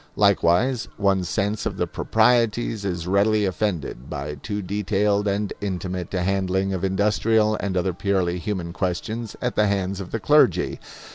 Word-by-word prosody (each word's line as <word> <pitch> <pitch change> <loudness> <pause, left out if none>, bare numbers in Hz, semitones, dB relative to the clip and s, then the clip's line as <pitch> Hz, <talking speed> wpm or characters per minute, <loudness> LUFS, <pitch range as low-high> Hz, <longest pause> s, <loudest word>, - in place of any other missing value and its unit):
Likewise, 100 +4 +3
one's 95 -3 +1
sense 105 +2 -1
of - - -5
the - - +1
proprieties 115 -1 +1
is 90 -4 -3
readily 100 +3 +2
offended 90 - -3
by 75 0 -4
too 105 +8 -5
detailed 105 +1 0
and 100 +1 -1
intimate 90 -2 -4
a 90 - 0
handling 95 0 0
of 95 0 -3
industrial 105 +3 +2
and 95 -2 -2
other 90 +1 0
purely 90 -1 0
human 90 -3 -4
questions 110 +6 -3
at 125 - -1
the 105 - +3
hands 100 -1 -1
of 95 - -7
the - - -3
clergy. - - +3
100 Hz, 155 wpm, -23 LUFS, 90-105 Hz, -, Likewise